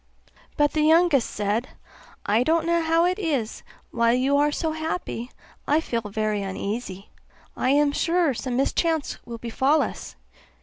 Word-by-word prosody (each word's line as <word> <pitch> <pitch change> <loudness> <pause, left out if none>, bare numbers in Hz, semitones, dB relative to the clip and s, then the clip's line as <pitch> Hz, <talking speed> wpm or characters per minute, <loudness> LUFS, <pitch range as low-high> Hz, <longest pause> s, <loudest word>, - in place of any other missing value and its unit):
But 295 0 +3
the 310 - 0
youngest 315 -4 +4
said, 210 +4 -2 0.6
'I 215 +3 +2
don't 325 +5 +2
know 340 0 +2
how 330 +1 +2
it 365 +3 0
is, 280 - -2 0.3
while 235 0 +2
you 265 +3 +2
are 295 +1 +3
so 320 +2 -2
happy 315 -6 -4 0.4
I 300 +2 +3
feel 235 -7 -2
very 210 0 -2
uneasy; 195 0 -5 0.5
I 255 - 0
am 290 +1 +3
sure 330 0 +1
some 250 +1 -3
mischance 320 +3 0
will 235 -1 -6
befall 265 +6 +1
us. 65 - -7
275 Hz, 150 wpm, -24 LUFS, 230-320 Hz, 0.6 s, youngest